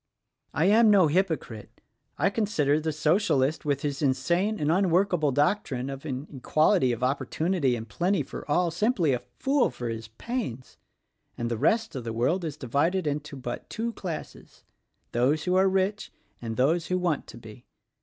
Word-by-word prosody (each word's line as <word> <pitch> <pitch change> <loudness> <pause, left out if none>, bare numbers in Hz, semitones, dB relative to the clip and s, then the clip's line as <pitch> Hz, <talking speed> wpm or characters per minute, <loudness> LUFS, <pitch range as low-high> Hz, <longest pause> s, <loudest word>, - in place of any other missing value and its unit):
I 160 - +2
am 220 +3 +6
no 200 -4 +6
hypocrite: 155 - -2 0.4
I - - +2
consider 160 -10 +1
the 160 0 -2
Socialist 155 -2 +1
with 140 -2 -1
his 145 -1 -2
insane 170 +10 +1
and 150 +1 +1
unworkable 180 -4 +2
doc 150 +10 +2
trine 130 0 -4
of 135 +2 -8
an 135 0 -4
equality 155 +1 +3
of 120 +1 -3
opportunity 145 +2 0
and 115 -1 -6
plenty 175 - 0
for - - -8
all, 170 +3 +2
simply 175 - +1
a 125 - -1 0.2
fool 275 -1 +2
for 120 -1 -5
his 115 -1 -5
pains; 130 - -5 0.6
and 120 0 -3
the - - 0
rest 220 - +1
of 130 - -4
the 115 -1 -4
world 150 +11 0
is 155 -3 -4
divided 155 +7 0
into 150 0 -3
but 125 -2 -6
two 230 +1 -3
classes; 175 -7 -8 0.5
those 140 +6 +1
who 180 - 0
are 190 +1 +4
rich 195 +2 -1 0.3
and 115 -2 -5
those 160 +6 +2
who 185 - 0
want 175 -5 -1
to - - -11
be. 115 +1 -13
155 Hz, 175 wpm, -27 LUFS, 130-185 Hz, 0.6 s, am